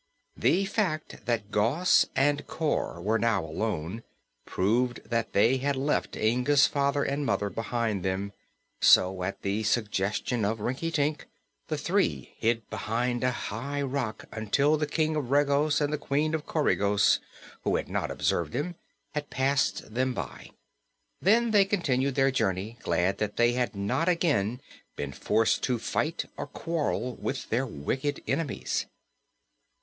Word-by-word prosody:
The 195 +4 +2
fact 195 -7 -2
that 110 -3 -1
Gos 130 +13 +3
and 145 +2 +2
Cor 155 - -1
were 110 +6 +1
now 105 -6 +1
alone 90 +3 -3 0.5
proved 120 +6 +1
that 115 -1 -1
they 115 +6 +4
had 140 +2 0
left 140 +3 -1
Inga's 125 +6 +3
father 140 0 +1
and 140 +1 -1
mother 105 -7 0
behind 115 -3 -1
them; 95 +1 -2 0.5
so, 90 0 +5
at 95 +2 -4
the 100 +2 0
suggestion 110 +1 0
of 110 +2 0
Rinkitink, 145 +5 -1 0.4
the - - -2
three - - 0
hid 115 -1 0
behind 120 +2 -1
a 125 - +3
high 130 +4 -3
rock 130 -5 -3
until 140 +8 +2
the 150 -1 -1
King 155 +1 0
of 145 -5 -2
Regos 145 +1 +3
and 145 0 0
the 150 - -1
Queen 150 +3 0
of 155 -2 -2
Coregos, 105 -10 +3 0.4
who - - +1
had - - -1
not - - -2
observed 85 -3 -1
them, 150 +7 -2 0.4
had 150 -1 -3
passed 135 -4 0
them 130 +1 0
by. - - -6 0.7
Then 230 +4 +4
they 205 -2 +6
continued 140 -9 0
their 135 0 +3
journey, 105 -1 -1
glad 90 +3 0
that 105 -1 -2
they 120 0 +4
had 125 -2 -1
not 100 - 0
again 125 - +1 0.3
been 70 -1 -4
forced 110 - +1
to 125 -2 0
fight 155 +8 -1
or - - -4
quarrel 150 -7 -2
with 135 - -4
their 130 +4 +1
wicked 130 - -3
enemies. 145 0 -1
125 Hz, 145 wpm, -28 LUFS, 110-145 Hz, 0.7 s, they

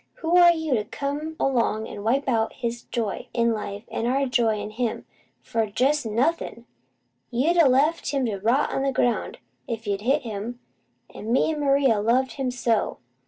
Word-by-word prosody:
Who 330 +1 +1
are 350 -1 +8
you, 320 -4 -1
to 215 -4 +1
come 290 +7 -4
'long 230 -4 +1
an' 205 - -8
wipe 265 +6 +1
out 225 -3 +1
his 235 0 -4
joy 225 -4 -3
in 235 -1 +2
life, 205 -1 -5
an' 230 - -2
our 270 +3 +1
joy 230 -4 +1
in 210 +1 -5
him, 230 +1 -3 0.4
for 225 -1 -1
jest 265 +5 +1
nothin'? 235 +1 -1 0.6
You'd 295 +9 +1
a 325 -5 +6
left 295 +6 +2
him 275 -3 0
to 205 -4 -2
rot 235 +8 +2
on - - 0
the 275 0 +1
ground, 245 -3 0 0.3
if 225 0 -4
you'd 200 -1 -1
a - - -11
hit 280 +3 +2
him; 225 +2 -5 0.5
an' 220 - -6
me 290 +5 +3
an' 305 - -4
Maria's 275 -7 +3
loved 255 +4 +2
him 270 -2 -2
so! 235 -3 0
245 Hz, 190 wpm, -24 LUFS, 225-275 Hz, 0.6 s, are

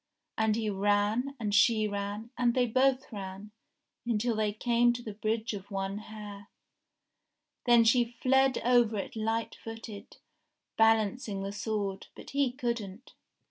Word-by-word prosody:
And 220 -1 +2
he 220 -1 -2
ran, 205 +6 +1
and 210 -3 -2
she 215 +1 +4
ran, 205 +3 -4
and 240 -1 +1
they 250 -1 +3
both 260 +3 +1
ran, 195 +1 -7 0.5
until 235 0 0
they 215 -1 +1
came 240 +2 +2
to 240 0 -7
the 215 - -6
Bridge 220 +2 -2
of 195 -1 -7
One 195 0 -3
Hair. 210 -2 -9 1.2
Then 240 -2 +6
she 235 +1 +2
fled 265 0 +3
over 240 -2 +3
it 195 - -5
light 225 +1 -1
footed, 225 -2 -9 0.6
balancing 220 -2 +2
the 195 - -3
sword, 205 -2 -3
but - - -11
he 280 -2 +1
couldn't. 235 -4 -4
220 Hz, 140 wpm, -30 LUFS, 205-240 Hz, 1.2 s, Then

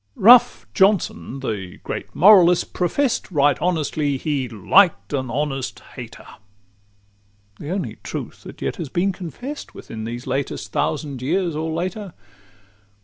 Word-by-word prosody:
VII - - -13
Rough 240 +3 +7
Johnson, 190 -8 +1
the 100 -8 -5
great - - -6
moralist, 180 -2 +6
profess'd, 230 +6 0
Right 145 -3 +3
honestly, 155 -5 0
"he 135 -3 -2
liked 155 - +3
an 130 -3 -2
honest 135 0 -3
hater!" - - -10 1.3
The 150 - -7
only 190 +2 -3
truth - - -7
that - - -10
yet - - -2
has 165 -7 -5
been 180 +7 0
confest 195 - -8
Within 110 -1 -8
these 120 +2 -6
latest 135 +1 -3
thousand 135 - -2
years 170 +5 0
or 160 +1 -2
later. 185 +3 -4
155 Hz, 135 wpm, -21 LUFS, 135-185 Hz, 1.3 s, Rough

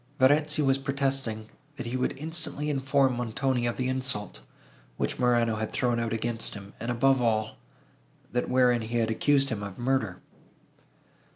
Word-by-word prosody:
Verezzi 150 +3 +4
was 135 0 +3
protesting, 135 -5 -2 0.3
that - - -5
he 120 +2 -3
would 130 - -1
instantly 155 -1 -3
inform 135 -1 +2
Montoni 125 +1 0
of 120 - -2
the 130 - 0
insult, 130 -6 -2 0.6
which - - -2
Morano 120 -2 +2
had 110 0 -3
thrown 120 -1 +1
out 115 -1 -2
against 115 0 -2
him, 100 0 -10
and 115 - -4
above 135 +2 +3
all, 110 -2 0 0.7
that, 125 +1 -1
wherein 125 -2 +4
he 115 +2 -2
had 115 -1 +1
accused 140 +4 +2
him 110 -5 -3
of 100 -2 -7
murder. 120 -7 0
125 Hz, 160 wpm, -28 LUFS, 115-135 Hz, 0.7 s, Verezzi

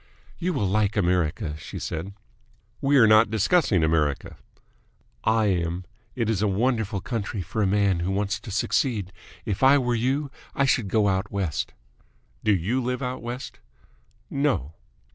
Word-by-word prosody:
"You 180 +1 -1
will 130 -9 0
like 105 +2 +1
America," 85 -5 0
she - - -8
said. 85 +5 -5 0.7
"We 140 +1 +3
are 120 - +7
not 110 0 +6
discussing 110 - +2
America." 75 -3 0 0.9
"I 110 0 +3
am. 90 -2 -1 0.3
It 115 -3 -1
is 110 -3 0
a 105 - +2
wonderful 105 -1 0
country 105 -5 -3
for 110 +6 -3
a 100 - +3
man 100 -2 +2
who 85 +2 -1
wants 100 +1 -1
to 120 - -11
succeed. 105 -1 0 0.3
If 105 -3 -3
I 135 +2 +7
were 125 -3 0
you, 135 +5 0 0.2
I 135 - +2
should 125 -5 +2
go 105 +1 +2
out 95 -1 0
West." 95 -7 -2 0.7
"Do 110 - +3
you 110 +9 0
live 125 +2 -2
out 125 0 -3
West?" 120 +2 -6 0.7
"No." 140 - -1
105 Hz, 160 wpm, -25 LUFS, 95-125 Hz, 0.9 s, are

